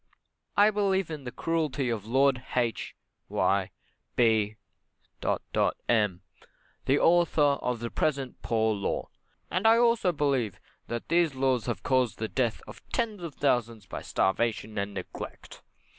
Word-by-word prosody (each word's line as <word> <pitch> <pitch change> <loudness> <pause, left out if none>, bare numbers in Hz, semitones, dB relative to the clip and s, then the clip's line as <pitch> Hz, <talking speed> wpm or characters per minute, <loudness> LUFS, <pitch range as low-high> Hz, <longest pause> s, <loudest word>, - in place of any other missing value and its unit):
I 205 +1 +6
believe 195 -4 +1
in 150 -4 -6
the 125 - -4
cruelty 150 -6 -1
of 110 -2 -4
Lord 130 +1 +3
H 120 -2 -1 0.3
y 95 -1 +1 0.5
B 110 -3 +3 1.3
m, 105 -6 +2 0.6
the 135 - +3
author 170 -2 +4
of 135 -4 +1
the 120 - -4
present 135 -4 -1
Poor 110 -1 +1
Law, 100 -1 -2 0.4
and 185 +5 +2
I 225 +1 +7
also 230 -5 +3
believe 135 - 0 0.3
that 120 0 -5
these 170 -4 +3
laws 130 -3 +1
have 120 - -3
caused 130 -3 +1
the 110 - -2
death 120 -1 -1
of - - -11
tens 220 -5 -1
of 165 -4 -6
thousands 120 -6 0
by - - -6
starvation 110 +2 0
and 100 0 -3
neglect. - - -8
130 Hz, 140 wpm, -28 LUFS, 115-165 Hz, 1.3 s, I